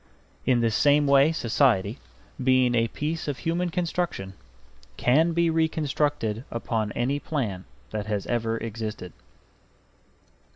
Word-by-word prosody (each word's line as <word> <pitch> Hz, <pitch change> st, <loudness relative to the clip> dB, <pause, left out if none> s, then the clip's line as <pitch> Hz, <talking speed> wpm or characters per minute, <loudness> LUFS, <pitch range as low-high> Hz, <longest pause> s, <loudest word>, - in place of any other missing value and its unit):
In 125 Hz, -2 st, +3 dB
the 115 Hz, -1 st, +2 dB
same 145 Hz, +6 st, +4 dB
way 140 Hz, +2 st, +5 dB
society, 115 Hz, -6 st, +1 dB, 0.4 s
being 130 Hz, -1 st, +4 dB
a 115 Hz, -1 st, +2 dB
piece 155 Hz, +7 st, -4 dB
of 145 Hz, -3 st, -2 dB
human 175 Hz, +2 st, -1 dB
construction, 170 Hz, -, -2 dB, 0.6 s
can 155 Hz, +7 st, +3 dB
be 170 Hz, 0 st, +2 dB
reconstructed 145 Hz, -7 st, 0 dB
upon 115 Hz, -2 st, -2 dB
any 135 Hz, +4 st, 0 dB
plan 110 Hz, -13 st, -3 dB, 0.3 s
that 105 Hz, -1 st, -4 dB
has 105 Hz, -2 st, -2 dB
ever 115 Hz, -1 st, -1 dB
existed. 110 Hz, -5 st, -5 dB
130 Hz, 120 wpm, -26 LUFS, 110-155 Hz, 0.6 s, way